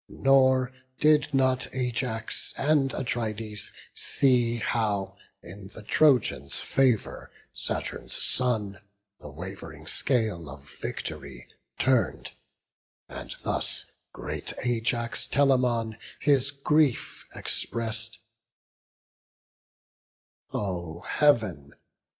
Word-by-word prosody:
Nor 130 -1 +4 0.3
did 150 -1 +4
not 130 -2 +2
Ajax 125 -3 -3
and 140 -2 +3
Atrides 110 -4 -3 0.2
see 120 -3 +2
How 105 -5 0 0.3
in 95 +2 -9
the 105 +2 -11
Trojans' 110 - +3
favour 130 -5 +1 0.2
Saturn's - - -4
son 110 -6 0 0.4
The 75 - -9
wav'ring 90 +6 -8
scale 110 - 0
of 70 +1 -10
vict'ry - - -6 0.3
turn'd; 130 -2 +2 0.8
and - - -7
thus - - -2 0.3
Great - - -5
Ajax 115 -1 -1
Telamon 125 -5 +2 0.2
his 140 -2 +3
grief 140 -1 +1
express'd: 115 0 -4 2.3
"O 85 -4 -3
Heav'n! 105 - +2
115 Hz, 80 wpm, -28 LUFS, 105-130 Hz, 2.3 s, Nor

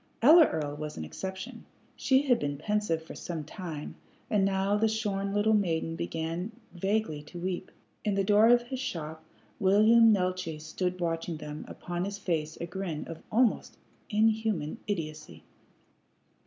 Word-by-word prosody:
Ella 315 +4 +9
Earl 145 -2 -3
was 150 0 -6
an 80 - -4
exception. 190 - -6 0.3
She 265 0 +3
had 250 -4 +3
been 145 0 -2
pensive 205 -2 -1
for 160 - -10
some 165 -3 -5
time, 155 -2 -6 0.4
and 205 -3 +3
now 195 +1 +2
the 220 +2 +3
shorn 205 -3 -1
little 205 +2 +3
maiden 165 -5 +1
began 165 +5 -3 0.2
vaguely 190 -4 -1
to 150 +4 -11
weep. 185 +1 -3 0.3
In 210 -2 0
the 195 - +2
door 210 +2 +5
of 240 0 +6
his 255 +1 -5
shop 160 - -5 0.4
William 220 +3 +6
Neeltje 185 -5 0
stood 180 +4 -3
watching 165 -1 -2
them, 150 0 -7
upon 175 +1 -4
his 200 0 -4
face 160 -6 -2
a - - -3
grin 180 -3 -4
of 165 - -8
almost 235 0 +2 0.3
inhuman 220 -5 +1
idiocy. 155 - -5
185 Hz, 155 wpm, -29 LUFS, 160-210 Hz, 0.4 s, Ella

